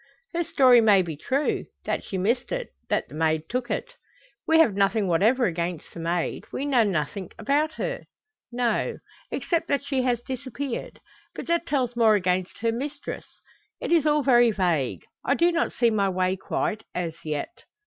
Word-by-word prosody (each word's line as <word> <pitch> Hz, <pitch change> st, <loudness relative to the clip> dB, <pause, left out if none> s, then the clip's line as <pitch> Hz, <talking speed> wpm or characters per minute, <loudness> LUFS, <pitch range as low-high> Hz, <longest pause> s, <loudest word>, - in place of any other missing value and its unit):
"Her 345 Hz, 0 st, 0 dB
story 255 Hz, -6 st, +5 dB
may 205 Hz, -4 st, +5 dB
be 165 Hz, -3 st, -5 dB
true 270 Hz, -, -1 dB, 0.2 s
that -, -, -1 dB
she 190 Hz, -, -4 dB
missed 235 Hz, +7 st, 0 dB
it, -, -, -3 dB, 0.2 s
that -, -, 0 dB
the -, -, -15 dB
maid 160 Hz, 0 st, +1 dB
took 245 Hz, +2 st, -3 dB
it." -, -, -1 dB, 0.6 s
"We 320 Hz, -, +5 dB
have 320 Hz, -10 st, +5 dB
nothing 200 Hz, +1 st, +2 dB
whatever 220 Hz, +9 st, +3 dB
against 170 Hz, -3 st, -3 dB
the -, -, -8 dB
maid. 170 Hz, +1 st, -2 dB
We 280 Hz, -, -3 dB
know 270 Hz, -4 st, +3 dB
nothing 185 Hz, -1 st, -2 dB
about 300 Hz, +3 st, +1 dB
her." -, -, -4 dB, 0.5 s
"No. 240 Hz, -2 st, 0 dB, 0.3 s
Except 335 Hz, -2 st, -1 dB
that 280 Hz, 0 st, 0 dB
she 275 Hz, -2 st, 0 dB
has 250 Hz, -2 st, +1 dB
disappeared. 260 Hz, +1 st, -5 dB, 0.4 s
But -, -, -6 dB
that 340 Hz, 0 st, +1 dB
tells 255 Hz, -4 st, 0 dB
more 225 Hz, -2 st, +5 dB
against 185 Hz, -2 st, 0 dB
her 230 Hz, 0 st, +2 dB
mistress. 280 Hz, +5 st, -5 dB, 0.5 s
It -, -, -4 dB
is 325 Hz, -3 st, +4 dB
all 295 Hz, -1 st, +3 dB
very 240 Hz, -3 st, +5 dB
vague. 175 Hz, -, 0 dB, 0.2 s
I -, -, +2 dB
do 345 Hz, +1 st, +3 dB
not 335 Hz, 0 st, 0 dB
see 235 Hz, -2 st, +2 dB
my 200 Hz, -3 st, +2 dB
way 185 Hz, 0 st, +1 dB
quite, 210 Hz, +3 st, -2 dB
as 170 Hz, -2 st, -3 dB
yet." 155 Hz, -, -3 dB
230 Hz, 180 wpm, -25 LUFS, 185-280 Hz, 0.6 s, story